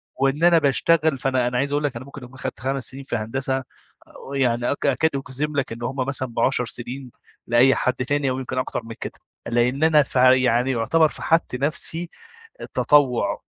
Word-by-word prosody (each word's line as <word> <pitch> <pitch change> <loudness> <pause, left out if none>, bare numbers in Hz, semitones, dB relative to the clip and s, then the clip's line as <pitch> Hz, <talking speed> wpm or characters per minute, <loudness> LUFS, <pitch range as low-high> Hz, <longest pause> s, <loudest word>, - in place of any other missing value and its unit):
وإن 135 +4 0
أنا 175 -1 +6
باشتغل. 155 +1 +2
فأنا 130 -1 0
أنا 125 0 -1
عايز 140 +3 0
أقول 145 +1 0
لك 145 -4 -1
أنا 120 +2 -7
ممكن 140 -1 -11
أكون 125 +1 -12
أخدت 130 - -6
5 135 +1 -2
سنين 135 +4 -5
في 135 - -4
هندسة 130 +4 -2 0.7
يعني 120 -3 +1
أ - - +1
أكاد 145 +2 +1
أجزم 140 +2 -3
لك 135 -4 -1
إن 115 +1 -7
هُم 130 - -3
مثلًا 130 -2 -2
ب10 125 +1 +2
سنين 125 +2 -7 0.4
لأي 120 +3 +5
حد 130 - 0
تاني 140 +2 -1
أو 130 0 -2
يمكن 130 0 -5
أكتر 130 - -2
من 115 0 -9
كده. - - -7 0.3
لأن 120 +4 +1
أنا 155 -2 +5
في 135 - -2 0.2
يعني 125 +1 +2
يعتبر 130 +7 +3
فَحَت 165 -2 0
نفسي 160 +5 -3 0.7
تطوع، 140 -5 +2
135 Hz, 185 wpm, -22 LUFS, 125-145 Hz, 0.7 s, أنا